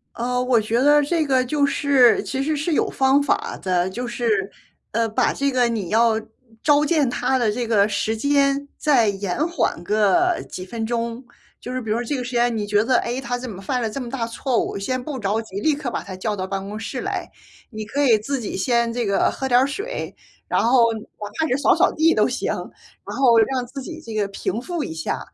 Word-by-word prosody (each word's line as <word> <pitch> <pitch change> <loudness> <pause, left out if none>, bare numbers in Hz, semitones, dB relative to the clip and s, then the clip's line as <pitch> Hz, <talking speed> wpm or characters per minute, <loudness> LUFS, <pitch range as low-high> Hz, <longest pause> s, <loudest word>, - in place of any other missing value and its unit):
呃， 250 +1 -1
我 250 -3 +3
觉 225 +3 0
得 295 +2 +5
这 320 +1 0
个 260 -2 +2
就 285 +3 +1
是 280 -3 +4
其 270 - -3
实 305 +3 0
是 305 +4 -2
有 - - +1
方 270 +1 +3
法 280 - -1
的， 180 -1 0
就 245 +6 -5
是， 230 -6 0 0.4
呃， 230 +1 +1
把 235 +3 +1
这 280 0 0
个 250 -2 +2
你 215 -7 -3
要 230 +1 +4 0.5
召 295 0 +4
见 300 -4 +2
他 255 +2 0
的 235 -4 +1
这 235 +2 -3
个 210 -3 +4
时 205 +2 -1
间 280 +3 +2
再 265 -8 +3
延 200 +7 -2
缓 340 - -1
个 215 - +2
几 185 - -7
分 225 +4 -4
钟。 235 +1 -3 0.4
就 250 - -7
是 255 - -2
比 225 - -7
如 220 - +1
说 240 - -2
这 285 - -2
个 255 - -3
时 245 - -6
间 240 -1 +1
你 210 -2 -2
觉 205 0 +2
得， 255 +1 +2
诶， 240 +2 -3
他 245 -2 -3
怎 250 0 -6
么 195 -3 -8
犯 250 +6 -1
了 225 - -1
这 245 - -5
么 250 -3 -5
大 235 -2 -2
错 240 +2 -1
误， - - -4
先 255 +5 -2
不 280 -1 -5
着 210 +1 0
急 200 -3 -7
立 300 +7 +2
刻 280 -4 -4
把 - - -3
他 190 - -8
叫 210 +3 -2
到 190 -2 -4
办 195 0 -4
公 210 +2 -6
室 240 +3 -5
来。 - - -3 0.4
你 215 -1 -5
可 250 +7 -2
以 245 -6 +5
自 270 +6 -3
己 225 - -5
先 235 +3 +1
这 240 -1 -1
个 200 -1 +2
喝 265 - -4
点 245 0 +5
儿 265 - +3
水， 405 - -5 0.3
然 - - +1
后 235 -1 +4
哪 220 - -6 0.4
怕 320 - +2
是 255 - +2
扫 280 - +4
扫 360 +3 +3
地 325 +1 +3
都 - - +4
行， - - -1
然 - - -9
后 245 -4 +5
让 250 +2 +1
自 270 +3 -8
己 325 +4 -8
这 230 -8 -9
个 210 -2 -1
平 200 +2 -3
复 345 +4 -4
一 160 - -4
下， 160 -1 -3
245 Hz, 255 characters per minute, -22 LUFS, 220-275 Hz, 0.5 s, 得